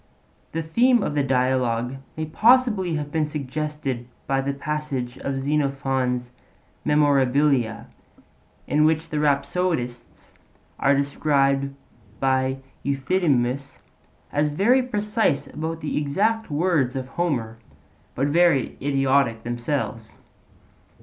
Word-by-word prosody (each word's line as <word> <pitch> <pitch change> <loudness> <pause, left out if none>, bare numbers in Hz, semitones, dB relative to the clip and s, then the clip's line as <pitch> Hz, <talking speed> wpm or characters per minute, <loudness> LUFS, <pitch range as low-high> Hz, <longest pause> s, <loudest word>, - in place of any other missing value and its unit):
The 165 0 -2
theme 235 +8 +3
of 150 - -2
the 145 - +1
Dialogue 130 -2 0 0.2
may 155 - -2
possibly 215 0 +3
have 145 -1 -4
been 155 -1 0
suggested 145 -3 -4 0.2
by 135 0 +1
the 140 +1 -1
passage 140 -3 -4
of 135 -1 -3
Xenophon's 135 -3 -1 0.5
Memorabilia 140 -4 +2 0.8
in 150 +3 +2
which 160 +1 +2
the 150 - -2
rhapsodists 140 -3 -1 0.5
are 140 +1 +4
described 140 -1 +1 0.4
by 130 0 +1 0.3
Euthydemus 140 -3 0 0.5
as 150 +1 +1
'very 205 - +3
precise 210 - 0
about 160 +1 -5
the 150 - -3
exact 205 +10 0
words 150 -5 +1
of 130 -1 -4
Homer, 125 -10 -2 0.6
but 135 - +1
very 160 -2 +2
idiotic 135 -4 +1
themselves.' 120 -1 -3
140 Hz, 105 wpm, -24 LUFS, 130-155 Hz, 0.8 s, are